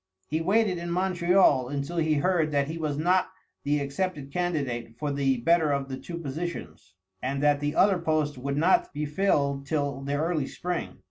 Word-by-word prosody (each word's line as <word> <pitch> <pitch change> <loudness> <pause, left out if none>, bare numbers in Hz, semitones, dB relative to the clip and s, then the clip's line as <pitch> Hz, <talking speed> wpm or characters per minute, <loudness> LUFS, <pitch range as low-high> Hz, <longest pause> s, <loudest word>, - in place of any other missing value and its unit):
He 160 +1 0
waited 195 0 +2
in 170 0 -5
Montreal 175 -6 +3
until 145 +4 -3
he 160 -2 +2
heard 165 +1 +2
that 140 -1 +1
he 160 +2 -5
was 150 -3 -2
not 180 +4 +2 0.3
the 145 +1 +1
accepted 140 0 -3
candidate 135 -10 -2
for 145 +3 -2
the 135 -2 +1
better 160 +5 +3
of 140 -1 -1
the 130 - -4
two 170 +5 -7
positions, 135 - -6 0.3
and 135 +2 -2
that 145 -1 +4
the 145 0 -2
other 195 -2 +4
post 155 -3 0
would 140 +2 -3
not 170 +5 +3
be 150 +1 -1
filled 140 -4 0
till 140 -2 -1
the 140 +1 -2
early 155 -2 0
spring. 180 -1 -4
150 Hz, 185 wpm, -27 LUFS, 140-175 Hz, 0.3 s, that